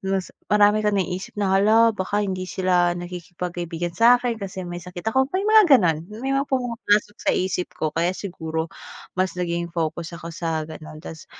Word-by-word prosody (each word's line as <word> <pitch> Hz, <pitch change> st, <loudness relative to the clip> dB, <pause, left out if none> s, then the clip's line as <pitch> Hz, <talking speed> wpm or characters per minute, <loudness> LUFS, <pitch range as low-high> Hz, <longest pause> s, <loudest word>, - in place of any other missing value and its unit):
mas 190 Hz, -, -1 dB, 0.2 s
marami 210 Hz, +1 st, +4 dB
kang 210 Hz, -1 st, +2 dB
naiisip 185 Hz, +1 st, -3 dB
na, 195 Hz, -2 st, +1 dB
hala 225 Hz, +3 st, +5 dB
baka 205 Hz, +1 st, -1 dB
hindi 185 Hz, -1 st, -3 dB
sila 180 Hz, -2 st, +2 dB
nakikipag 175 Hz, 0 st, -6 dB
kaibigan 170 Hz, 0 st, -3 dB
sa'kin 245 Hz, 0 st, +4 dB
kasi 190 Hz, -1 st, -5 dB
may 175 Hz, 0 st, -5 dB
sakit 180 Hz, 0 st, -9 dB
ako, 265 Hz, 0 st, +3 dB
may 390 Hz, -, 0 dB
mga 435 Hz, 0 st, +7 dB
gano'n. 165 Hz, -6 st, +2 dB, 0.3 s
May 270 Hz, -, 0 dB
mga 275 Hz, +1 st, 0 dB
pumapasok 230 Hz, -5 st, 0 dB
sa -, -, +2 dB
isip 185 Hz, -1 st, -1 dB
ko 155 Hz, -1 st, -1 dB
kaya 170 Hz, +2 st, +1 dB
siguro 160 Hz, -4 st, -4 dB, 0.5 s
mas 185 Hz, 0 st, 0 dB
naging 170 Hz, -1 st, -1 dB
focus 165 Hz, 0 st, -3 dB
ako 170 Hz, 0 st, -8 dB
sa 165 Hz, -2 st, -2 dB
gano'n 155 Hz, -1 st, -10 dB
tapos 160 Hz, -1 st, -9 dB
185 Hz, 180 wpm, -23 LUFS, 170-210 Hz, 0.5 s, mga